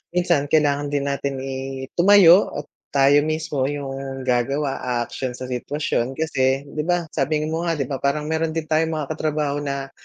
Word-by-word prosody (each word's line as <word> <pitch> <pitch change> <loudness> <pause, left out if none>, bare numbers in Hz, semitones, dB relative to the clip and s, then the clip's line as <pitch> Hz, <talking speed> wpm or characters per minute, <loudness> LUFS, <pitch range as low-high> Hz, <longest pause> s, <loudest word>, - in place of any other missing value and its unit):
minsan 170 -5 +2
kailangan 145 -1 +2
din 140 -1 0
natin 140 0 -2
i 135 0 -5
tumayo 190 0 +7 0.2
at - - -29 0.3
tayo 140 +1 +6
mismo 155 -4 -1
yung 135 -2 -5
gagawa, 135 +3 0 0.2
aaksyon 125 +1 -5
sa 130 0 -7
sitwasyon 130 -1 -2
kasi 135 -3 0
di 150 - -8
ba, 175 +1 +1
sabi 150 +1 0
mo 160 +2 -2
nga 165 - +1
di 145 - -1
ba, 135 0 -4
parang 140 +2 0
meron 160 0 -1
din 165 - -1
tayong 160 +1 +1
mga 150 -3 -3
katrabaho 150 -2 -1
na, 140 -1 -4
145 Hz, 175 wpm, -22 LUFS, 135-155 Hz, 0.3 s, tumayo